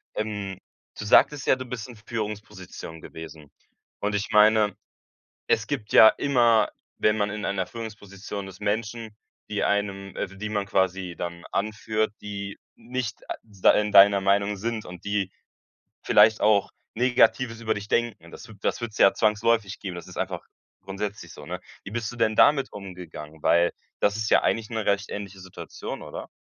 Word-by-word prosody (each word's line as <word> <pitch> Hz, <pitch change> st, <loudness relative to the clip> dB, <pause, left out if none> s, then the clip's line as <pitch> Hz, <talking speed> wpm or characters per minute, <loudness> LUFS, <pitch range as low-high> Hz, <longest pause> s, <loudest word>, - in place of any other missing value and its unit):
Ähm, 105 Hz, -3 st, -4 dB, 0.4 s
du 110 Hz, -, -5 dB
sagtest 145 Hz, +6 st, +5 dB
ja, -, -, +5 dB
du 130 Hz, 0 st, -7 dB
bist 125 Hz, -1 st, -6 dB
in 120 Hz, -, -11 dB
Führungspositionen 105 Hz, -7 st, -7 dB
gewesen, 80 Hz, -3 st, -10 dB, 0.5 s
und 105 Hz, 0 st, 0 dB
ich 100 Hz, +2 st, -2 dB
meine, 105 Hz, 0 st, +5 dB, 0.7 s
es -, -, +2 dB
gibt 105 Hz, -, -4 dB
ja 110 Hz, -, +10 dB
immer, 120 Hz, -5 st, +3 dB, 0.3 s
wenn 105 Hz, 0 st, +2 dB
man 105 Hz, -1 st, +1 dB
in 105 Hz, 0 st, -4 dB
einer 95 Hz, -2 st, -1 dB
Führungsposition 105 Hz, -3 st, -7 dB
ist, 95 Hz, +2 st, -12 dB
Menschen, 110 Hz, +1 st, -2 dB, 0.3 s
die -, -, -1 dB
einem 100 Hz, -1 st, -1 dB
äh 95 Hz, -, -3 dB
w -, -, -13 dB
die 105 Hz, +1 st, -4 dB
man 100 Hz, -2 st, -1 dB
quasi 95 Hz, -2 st, 0 dB
dann 85 Hz, 0 st, -5 dB
anführt, 110 Hz, +1 st, -1 dB
die 100 Hz, -1 st, -6 dB, 0.2 s
nicht 120 Hz, -2 st, -5 dB
a -, -, -2 dB
da 100 Hz, -4 st, +3 dB
in 105 Hz, 0 st, +1 dB
deiner 100 Hz, 0 st, +8 dB
Meinung 100 Hz, +1 st, +2 dB
sind, 110 Hz, +2 st, -3 dB
und 90 Hz, +1 st, -10 dB
die 100 Hz, -2 st, -1 dB, 0.7 s
vielleicht 105 Hz, +1 st, +5 dB
auch 105 Hz, -2 st, +3 dB, 0.2 s
Negatives 120 Hz, -1 st, +2 dB
über 110 Hz, -1 st, +1 dB
dich 105 Hz, 0 st, -6 dB
denken. 115 Hz, -9 st, -1 dB
Das -, -, -11 dB
wü 110 Hz, -, -12 dB
das -, -, -1 dB
würd's 110 Hz, -2 st, -5 dB
ja 100 Hz, -, +6 dB
zwangsläufig 110 Hz, -1 st, +1 dB
geben, 95 Hz, -3 st, -5 dB
das 85 Hz, -, -8 dB
ist -, -, -11 dB
einfach -, -, -3 dB, 0.4 s
grundsätzlich 100 Hz, -3 st, -5 dB
so, -, -, -11 dB
ne? -, -, -5 dB, 0.2 s
Wie 95 Hz, -, -8 dB
bist 115 Hz, 0 st, -3 dB
du -, -, -10 dB
denn 110 Hz, -2 st, +1 dB
damit 140 Hz, +2 st, +5 dB
umgegangen? 90 Hz, -6 st, -9 dB
Weil, 85 Hz, +1 st, +4 dB, 0.3 s
das 100 Hz, 0 st, +2 dB
ist 110 Hz, -1 st, -1 dB
ja -, -, +5 dB
eigentlich 115 Hz, -1 st, 0 dB
'ne 110 Hz, -3 st, -3 dB
recht 100 Hz, 0 st, +1 dB
ähnliche 100 Hz, -2 st, -6 dB
Situation, 95 Hz, -1 st, -8 dB
oder? -, -, -8 dB
105 Hz, 175 wpm, -26 LUFS, 95-110 Hz, 0.7 s, ja